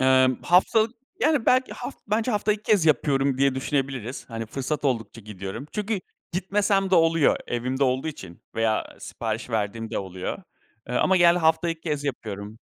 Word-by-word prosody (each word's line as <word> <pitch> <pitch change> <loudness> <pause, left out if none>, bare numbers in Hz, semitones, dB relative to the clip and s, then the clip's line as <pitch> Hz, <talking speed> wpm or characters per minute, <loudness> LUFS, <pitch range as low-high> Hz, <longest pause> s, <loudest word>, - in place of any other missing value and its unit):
Eee, 130 0 +5
haftalık, 220 +6 +3 0.2
yani 300 - +2
belki 255 +1 +3
haf - - -6
bence 220 +4 0
haftada 210 -1 +2
2 210 - -11
kez 205 -7 +3
yapıyorum 140 -3 +2
diye 135 -1 +3
düşünebiliriz. 135 -3 -2
Hani 115 0 -4
fırsat 140 +5 -3
oldukça 115 -3 -1
gidiyorum. 100 +4 -7
Çünkü 210 -1 -2 0.3
gitmesem 195 +1 +1
de - - +5
oluyor. 165 -3 +4
Evimde 130 +3 -1
olduğu 130 +4 0
için 95 - -9
veya 110 -1 0
sipariş 115 +1 -4
verdiğim 110 +1 -2
de - - -2
oluyor. 95 -1 -5 0.5
Eee, 125 - -3
ama 190 +9 +3
genelde 175 0 +6
hafta 160 0 +2
2 165 -1 -3
kez 150 -3 -3
yapıyorum. 110 -5 -5
140 Hz, 165 wpm, -25 LUFS, 115-185 Hz, 0.5 s, genelde